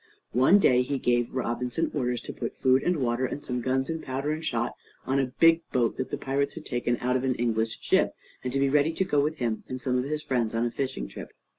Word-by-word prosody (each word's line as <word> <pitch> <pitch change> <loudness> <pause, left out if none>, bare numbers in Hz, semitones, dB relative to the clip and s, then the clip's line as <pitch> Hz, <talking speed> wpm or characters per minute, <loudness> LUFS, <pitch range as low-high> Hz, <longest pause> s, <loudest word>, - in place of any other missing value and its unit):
One 130 - +6
day 125 -10 +4
he 135 +2 -1
gave 120 -2 +1
Robinson 125 +3 -1
orders 125 -4 -1
to - - -7
put - - -5
food 130 0 +4
and 180 -1 +1
water, 125 -2 0
and 145 - -6
some 125 -1 -2
guns, 130 +2 0
and 160 -1 -3
powder 135 +3 -2
and 155 +1 -3
shot, 120 -6 -1 0.3
on 135 +1 +1
a 135 - +1
big 165 0 +6
boat 120 -3 +1
that 130 - -3
the - - -3
pirates 140 +1 -1
had 160 - -8
taken 120 -1 -1
out 125 +1 +1
of 130 - 0
an 130 -1 +1
English 115 -2 0
ship, - - +2 0.3
and 125 - -2
to 135 - -1
be 140 - +3
ready 145 +3 +3
to 190 - 0
go 145 - +2
with 150 +2 +1
him 120 -6 -2
and 130 - -4
some 125 0 0
of 125 - -2
his 150 +1 -3
friends 115 -4 0
on 115 +1 +1
a 120 - -1
fishing 130 - -3
trip. - - -9
130 Hz, 255 wpm, -27 LUFS, 120-140 Hz, 0.3 s, One